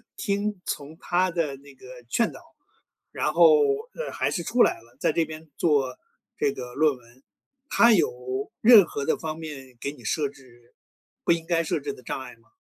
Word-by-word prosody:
听 205 - -2
从 150 +2 -5
他 180 +1 +1
的 165 -5 -1
那 140 +1 -16
个 130 - -17 0.2
劝 230 - +1
导， - - -12 0.7
然 - - -1
后， 475 - +7 0.4
呃， - - -5
还 - - -1
是 175 - -2
出 240 +7 +3
来 - - +3
了， 115 +1 -22
在 - - +2
这 165 +1 +1
边 160 0 -10
做 140 -6 +1 0.4
这 145 - +1
个 125 -1 -8
论 150 -1 +2
文。 120 +2 -22 0.5
他 235 - +5
有 130 - 0
任 220 -4 +9
何 140 -3 -4
的 160 - +1
方 155 -1 -5
面 135 -6 -9
给 140 - -2
你 135 -5 -15
设 145 +6 0
置 120 -3 -20 0.5
不 - - +4
应 165 -1 -4
该 170 -1 +1
设 160 - -1
置 430 - -4
的 420 - -14
障 - - -4
碍 - - -10
吗？ - - -29
155 Hz, 210 characters per minute, -25 LUFS, 130-175 Hz, 0.7 s, 任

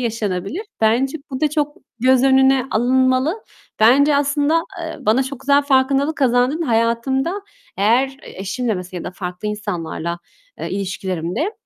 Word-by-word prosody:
yaşanabilir. 220 - -2 0.2
Bence 245 +7 +2
bu 260 - -4
da 305 -1 +2
çok 295 0 -1 0.2
göz 255 +1 +4
önüne 265 -1 +4
alınmalı. 260 - +1 0.4
Bence 280 +6 +5
aslında, 290 +3 +2 0.2
eee, 325 -1 -5
bana 225 +5 +4
çok 265 0 -7
güzel 280 +1 +3
farkındalık 275 +2 +2
kazandırdın. 255 +4 +2
Hayatımda 265 - 0 0.4
eğer 250 +6 +2
eşimle 220 +4 -3
mesela 180 -1 -6
ya - - -8
da - - -4
farklı 180 +2 -5
insanlarla, 170 -4 -4 0.4
eee, - - -4
ilişkilerimde 190 - -3
260 Hz, 135 wpm, -19 LUFS, 215-280 Hz, 0.4 s, Bence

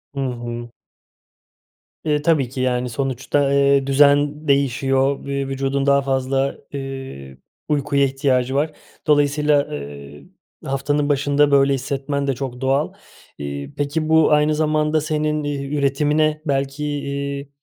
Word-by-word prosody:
Hı - - -4
hı. 120 -2 -4 1.4
E, 150 -1 +1
tabii 150 -6 +2
ki 130 - -7
yani 125 -1 0
sonuçta, 135 +2 0
eee, 140 -1 +3
düzen 145 +2 +3
değişiyor 135 0 +1
ve 140 -1 -2
vücudun 135 0 -1
daha 140 0 +4
fazla, 135 0 0 0.2
eee, 135 - -7 0.3
uykuya 140 -1 +1
ihtiyacı 135 -1 0
var. 150 +2 +1 0.4
Dolayısıyla, 150 0 +3
ııı, 70 0 -8 0.4
haftanın 145 +2 0
başında 145 +1 +2
böyle 140 0 +4
hissetmen 140 +1 -2
de 135 - 0
çok 125 -1 -6
doğal. 135 +3 +1 0.4
İii, 70 0 -6
peki 155 +2 -1
bu 160 -1 +5
aynı 150 +1 +3
zamanda 155 0 +1
senin, 155 0 -1
eee, 140 -1 -3
üretimine 150 +2 +1
belki, 140 0 -1
iii, 140 -1 -4
140 Hz, 125 wpm, -21 LUFS, 135-145 Hz, 1.4 s, bu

